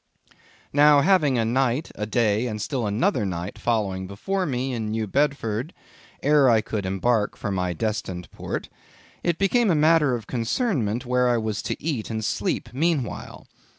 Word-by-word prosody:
Now 145 0 +6
having 150 -6 +3
a 115 - +1
night, 130 +5 0
a 105 - -4
day, 110 +1 +1
and 110 -2 -4
still 120 +1 -2
another 110 - +1
night 90 0 -4
following 100 -5 -1
before 185 - -2
me 130 -1 -2
in 110 -3 -3
New 110 0 -1
Bedford, 135 - -1 0.5
ere 145 -2 +5
I 115 -2 +5
could 105 -2 -3
embark 105 +3 0
for 100 - -3
my 90 -2 -1
destined 95 -2 -3
port, - - -5 0.5
it 170 -2 0
became 210 +4 +2
a 170 - +3
matter 150 -3 +4
of 115 -3 -6
concernment 120 - -1
where 125 0 +2
I 120 - +3
was 110 -2 -2
to - - -4
eat 145 -9 -3
and 110 -1 -3
sleep - - -1
meanwhile. 145 -4 -2
120 Hz, 165 wpm, -24 LUFS, 105-145 Hz, 0.5 s, Now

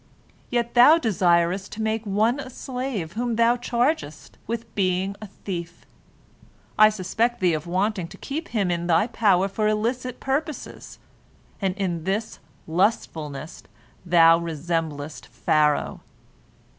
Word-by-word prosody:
Yet 235 -1 -1
thou 260 +7 +8
desirest 185 - +1
to 220 - -5
make 220 0 -1
one 220 +6 +1
a 270 - -6
slave 250 -9 -4
whom 235 +2 -1
thou 235 +1 +4
chargest 245 - -2
with 230 0 -5
being 190 0 0
a 215 - -7
thief. 175 -3 -7 0.9
I 215 0 +7
suspect 215 +4 -1
thee 180 -3 +3
of 155 +1 -3
wanting 185 0 -1
to - - -13
keep 310 +4 -5
him 200 -6 0
in 170 0 -2
thy 175 +4 +4
power 200 -5 +2
for 210 +2 -1
illicit 240 +4 -1
purposes, 290 +3 -4 0.6
and 190 -2 0
in 175 -5 -2
this 205 +4 -2 0.3
lustfulness 160 -5 -1 0.4
thou 165 -2 +6
resemblest 160 -2 -4
Pharaoh. 150 -1 +1
200 Hz, 130 wpm, -24 LUFS, 170-235 Hz, 0.9 s, thou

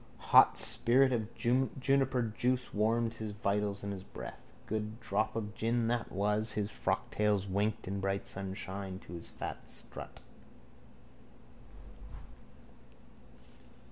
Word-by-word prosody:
Hot - - +8
spirit 130 +2 +4
of 110 -3 -1
juniper 130 +2 +2
juice 125 +1 0
warmed 115 +2 +2
his 110 -2 -5
vitals 100 -1 -1
and 100 0 -3
his 95 - -6
breath. - - -9
Good 110 +1 -3
drop 110 -2 0
of 105 -2 -3
gin, 115 +1 0
that 120 -1 -1
was. 105 +2 +1
His 105 0 -1
frocktails 105 -2 0
winked 100 +2 -1
in 100 +1 -2
bright 95 0 -1
sunshine 95 0 -5
to - - -11
his 85 - -5
fat - - -7
strut. - - -6
105 Hz, 115 wpm, -33 LUFS, 100-115 Hz, -, Hot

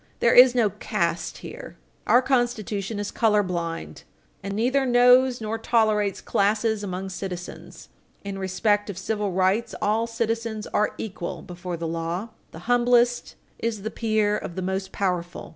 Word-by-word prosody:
There 235 - +4
is 250 0 +8
no 225 -5 +3
caste 170 -1 -2
here. - - -9 0.3
Our 250 - +5
Constitution 225 -5 -1
is 205 0 -3
color 210 -3 +3
blind, 165 - -4 0.4
and 200 +1 -5
neither 255 +5 +2
knows 250 0 +5
nor 220 0 -3
tolerates 215 -3 +1
classes 210 +1 +1
among 190 0 -4
citizens. 180 -1 -8 0.3
In 200 -1 -5
respect 205 +2 0
of 195 - -6
civil 205 +1 -2
rights, 190 +5 +1
all 220 +2 +1
citizens 230 -1 -2
are 210 - 0
equal 190 -5 -6
before 180 -1 -6
the 165 - -5
law. 165 +6 -3 0.2
The - - -11
humblest 245 0 +2 0.2
is 220 -3 -3
the 220 - -3
peer 215 -2 +1
of 170 - -5
the 185 - -3
most 190 +1 -3
powerful. 180 -3 -3
210 Hz, 150 wpm, -24 LUFS, 190-230 Hz, 0.4 s, is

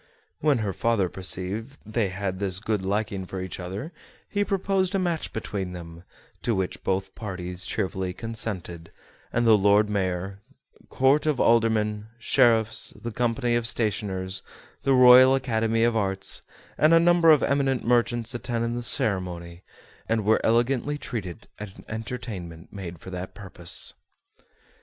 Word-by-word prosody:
When 150 -3 +3
her 100 - -2
father 115 -4 +1
perceived 95 +8 -3
they 110 -1 0
had 95 0 -3
this 95 -2 -1
good 105 -1 -2
liking 100 -1 -2
for 95 - -5
each 95 0 -5
other 100 - -6 0.3
he 205 0 0
proposed 195 -1 0
a - - +3
match 175 -4 -1
between 100 -4 -4
them, 85 -1 -9 0.4
to 115 - 0
which 95 -1 -3
both 95 0 -1
parties 90 -3 -5
cheerfully 95 -3 -2
consented, 90 -6 -4 0.4
and 120 0 +1
the 110 -1 +7
Lord 105 +1 +4
Mayor, 95 -1 -2 0.5
Court 140 +3 +3
of 150 -4 +1
Aldermen, 110 -2 +2
Sheriffs, 115 -3 +2
the 120 - -5
Company 120 +1 0
of 120 -1 +1
Stationers, 95 -4 -2 0.4
the 135 0 +3
Royal 130 +1 +8
Academy 115 -3 +1
of 120 -1 +2
Arts, 95 -2 -1 0.4
and 155 +2 +6
a - - +7
number 170 -1 +5
of 155 -3 +6
eminent 135 -2 +1
merchants 120 -1 +1
attended 120 -1 -2
the 120 - -3
ceremony, 90 -6 -1 0.5
and 110 -2 +1
were 110 +1 +3
elegantly 125 +5 +1
treated 110 - -6
at 105 -2 -8
an - - -14
entertainment 105 -7 -6
made 90 -4 -7
for 95 - -11
that 90 0 -6
purpose. 90 -4 -4
110 Hz, 145 wpm, -26 LUFS, 95-120 Hz, 0.5 s, Royal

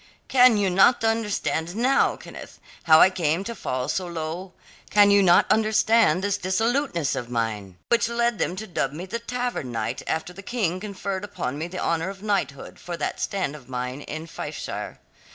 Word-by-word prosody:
"Can 250 -3 +6
you 195 -2 +1
not 195 +6 +4
understand 210 -6 -1
now, 255 +4 +3
Kenneth, - - -11 0.3
how 160 -1 +7
I 190 - +7
came 170 0 0
to 235 - -5
fall 130 - -3
so 185 -2 -2
low? 170 +2 -5 0.4
Can 205 -1 +5
you 200 0 +6
not 175 -2 +5
understand 220 -4 +3
this 205 0 0
dissoluteness 190 - 0
of 120 - -4
mine, 110 -6 -3
which 235 -1 +2
led 235 -2 0
them 180 - -1
to 215 +3 -6
dub 155 -8 -2
me 170 +5 -6
the 230 +5 -4
Tavern 245 - -3
Knight 115 +1 -3
after 160 +3 -2
the 195 - -10
King 195 -5 -2
conferred 200 -1 -4
upon 140 -10 -4
me 160 - -3
the 185 +1 -8
honour 170 0 -1
of 195 0 -9
knighthood 195 -10 -2
for 175 -1 -6
that - - -3
stand 185 -7 -2
of 135 -4 -14
mine 125 +2 -4
in 155 +2 -6
Fifeshire? 165 - -6
185 Hz, 185 wpm, -24 LUFS, 155-215 Hz, 0.4 s, how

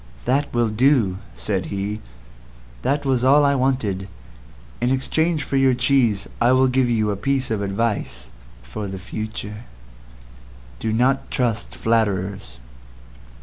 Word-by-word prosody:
"That 140 +3 +1
will 120 -2 +1
do," 110 -4 +2 0.2
said - - -2
he. 100 +2 -3 0.8
"That 140 +3 0
was 130 -2 +1
all 145 +3 +5
I 140 - +4
wanted. 125 -8 0 0.7
In 120 - +2
exchange 155 +4 0
for 135 - -1
your 135 -1 +4
cheese 125 -5 +2
I 120 +2 +5
will 130 0 +4
give 130 -1 +2
you 110 -3 +1
a - - -1
piece 130 +4 -1
of 110 -2 0
advice 100 - -2 0.3
for 65 - -6
the 95 0 -5
future— 105 +2 -6 1.1
"DO 110 - -1
NOT 125 +4 +1
TRUST 115 -3 -1
FLATTERERS. 100 - -1
115 Hz, 135 wpm, -22 LUFS, 100-130 Hz, 1.1 s, all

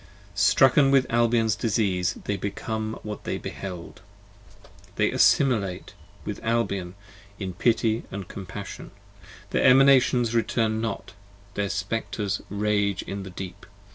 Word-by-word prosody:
Strucken 135 +1 +5
with 135 -1 +4
Albion's 115 -2 +2
disease 100 -5 0
they 105 - -1
become 110 +3 -4
what 105 -1 -6
they - - -3
behold: 90 -4 -8 0.9
They - - +2
assimilate 105 -10 +2 0.3
with - - -5
Albion 100 -6 -1 0.4
in 95 -3 -5
pity 115 +3 +1 0.2
& 95 -3 -7
compassion: 100 +1 -8 0.6
Their - - +1
Emanations 130 -3 +5
return 110 -1 0
not: 110 -3 -4 0.4
their 100 -1 -2
Spectres 100 0 -2
rage 100 -1 0
in 100 0 -5
the 95 - -8
Deep. 95 0 -8
105 Hz, 115 wpm, -25 LUFS, 100-115 Hz, 0.9 s, Strucken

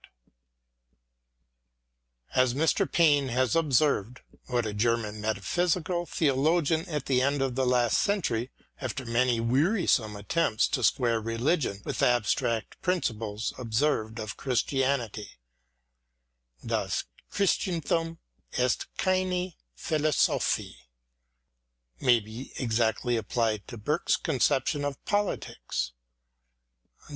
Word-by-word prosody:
t - - -17 2.3
As 130 -1 +3
Mr. 160 +3 +1
Payne 145 -5 +4
has 125 -1 +1
observed, 140 -6 +1 0.3
what 120 -2 0
a 105 - -3
German 110 -1 0
metaphysical 175 - 0
theologian 160 +3 +1
at 150 -4 -3
the 125 -2 +2
end 140 +2 +1
of 135 -2 0
the 130 0 0
last 120 -2 +3
century, 135 - 0 0.3
after 130 0 -4
many 120 0 +2
wearisome 130 - +2
attempts 110 +2 +1
to 130 - -1
square 115 0 +2
religion 115 - -1
with - - -3
abstract 115 -2 +1
principles, 115 - -1
observed 115 -2 0
of 110 -1 -5
Christianity, 130 -4 -1 1.3
Das - - -1 0.3
Christenthum 165 -4 0 0.4
ist 125 -1 0
keine 185 -1 0 0.2
Philo 155 -1 0
sophie, - - +1 1.2
may 120 -2 +4
be 110 +5 -9
exactly 120 0 0
applied 110 -1 -1
to 120 - -8
Burke's 105 - 0
concep 135 -3 +1
tion 145 -1 -1
of 145 -2 -2
politics. 205 - -2
125 Hz, 105 wpm, -28 LUFS, 115-155 Hz, 2.3 s, Payne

